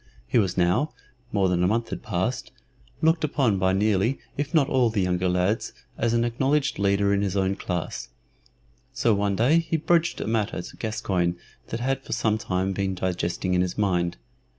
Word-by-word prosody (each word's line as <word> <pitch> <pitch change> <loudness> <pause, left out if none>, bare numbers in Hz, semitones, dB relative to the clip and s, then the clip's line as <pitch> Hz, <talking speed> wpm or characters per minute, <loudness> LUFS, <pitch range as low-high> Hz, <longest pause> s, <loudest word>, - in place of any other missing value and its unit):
He 60 - +2
was 95 -3 0
now 95 - +2 0.4
(more 100 -2 +2
than 90 -1 +1
a - - +4
month 115 +3 0
had - - -5
passed) - - -2 0.5
looked 160 +1 +3
upon 130 -9 +1
by 95 0 +3
nearly 105 +5 +2 0.2
if 145 0 -3
not 150 -5 +3
all 130 -4 +3
of 110 - -3
the 105 - +1
younger 90 0 +1
lads 90 +5 0 0.2
as 115 0 0
an 115 0 +2
acknowledged 135 +4 0
leader 100 0 +2
in 100 - +1
his 100 -1 -1
own 95 0 +1
class. 90 -4 -4 0.8
So 115 - +2
one 100 -1 +1
day 130 +11 +4
he 165 0 -1
broached 170 +2 +1
a - - -3
matter 110 -4 -1
to - - -11
Gascoyne 95 -6 -1 0.3
that 115 - -4
had 135 +1 -1
for - - -5
some 110 -1 +1
time 95 -1 -1
been 95 0 -1
digesting 90 0 -1
in 90 - +3
his 90 -1 -2
mind. 90 -4 0
100 Hz, 195 wpm, -25 LUFS, 95-120 Hz, 0.8 s, a